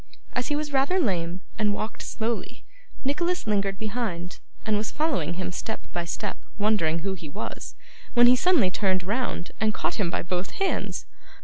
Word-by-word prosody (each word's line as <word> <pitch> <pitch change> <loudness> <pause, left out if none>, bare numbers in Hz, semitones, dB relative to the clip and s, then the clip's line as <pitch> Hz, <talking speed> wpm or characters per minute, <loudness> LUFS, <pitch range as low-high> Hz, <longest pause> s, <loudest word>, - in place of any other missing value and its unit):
As 250 -1 0
he 295 - +1
was 295 -1 -2
rather 275 +8 +4
lame, 180 - 0 0.2
and 210 -1 +3
walked 215 +2 -4
slowly, 230 0 -2 0.4
Nicholas 345 +6 +1
lingered 200 -2 +1
behind, 205 -6 -3 0.3
and 215 - +3
was 210 +1 0
following 270 - 0
him 185 0 -2
step - - -3
by 175 -1 -1
step, 165 - -3 0.2
wondering 175 -7 +2
who 195 - +1
he 165 -5 -7
was, - - -5 0.4
when 240 0 +8
he 245 +1 +8
suddenly 270 - +4
turned 185 -1 +2
round 210 -2 -1
and 215 -1 +3
caught - - -1
him 190 -5 +2
by - - -1
both 180 +2 -2
hands. 390 -1 0
210 Hz, 175 wpm, -27 LUFS, 180-250 Hz, 0.4 s, when